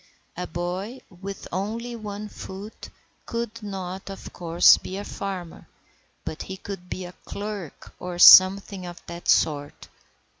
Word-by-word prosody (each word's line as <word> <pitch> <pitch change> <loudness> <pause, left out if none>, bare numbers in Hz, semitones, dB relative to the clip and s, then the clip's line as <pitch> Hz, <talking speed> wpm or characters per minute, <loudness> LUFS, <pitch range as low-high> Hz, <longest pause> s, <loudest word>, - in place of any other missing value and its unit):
A 180 0 -4
boy 185 +9 -4
with 195 +2 -8
only 225 +6 -3
one 210 -1 -6
foot 205 +1 -9 0.4
could 230 -1 -4
not, 190 -2 -6
of 195 - -9
course, 170 0 +6
be 190 - -6
a 200 - -4
farmer, 185 -4 -6 0.6
but 155 - -5
he 190 - -6
could 190 -2 -8
be 185 - -4
a 175 - -9
clerk 200 -6 -7
or 180 -1 -5
something 185 +1 +8
of 175 0 -9
that 170 0 -8
sort. 145 -2 +1
190 Hz, 140 wpm, -25 LUFS, 175-205 Hz, 0.6 s, something